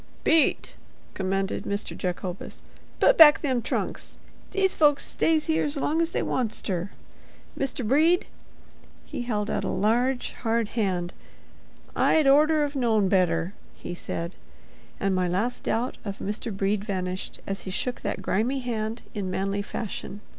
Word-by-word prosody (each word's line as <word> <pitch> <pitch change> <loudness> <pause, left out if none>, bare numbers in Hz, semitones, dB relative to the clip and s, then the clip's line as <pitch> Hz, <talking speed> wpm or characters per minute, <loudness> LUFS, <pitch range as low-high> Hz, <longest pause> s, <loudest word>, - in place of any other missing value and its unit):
"Pete!" 320 -1 +2 0.4
commanded 195 0 -1
Mr. 200 +1 -3
Jacobus, 180 0 -4 0.4
"put - - +5
back 295 -2 +9
them 260 -5 0
trunks. - - -3 0.3
These 385 -1 +1
folks 290 -2 +3
stays 315 -1 +1
here's 315 -2 0
long's 320 +4 +1
they - - -1
wants 240 -4 -1
ter. 185 -1 -3 0.7
Mr. 260 -4 -2
Brede"—he 315 -2 -1
held 215 -3 -1
out - - -1
a - - -2
large, 245 +6 +1
hard 230 -2 +1
hand—"I'd 195 - -2
orter've 295 +1 +4
known 220 -7 +2
better," 175 -1 +2 0.2
he - - -7
said. 170 0 -5 0.7
And 195 -1 +1
my 185 -1 +1
last 210 +8 -1
doubt 240 +3 -1
of 200 -2 -5
Mr. 210 +3 -4
Brede 195 +1 0
vanished 185 -3 -4
as 195 0 -4
he - - -4
shook 245 +6 -3
that - - -3
grimy 250 +7 0
hand 225 -2 -3
in 200 -3 -3
manly 195 +2 -1
fashion. 205 -1 -5
220 Hz, 135 wpm, -26 LUFS, 195-275 Hz, 0.7 s, back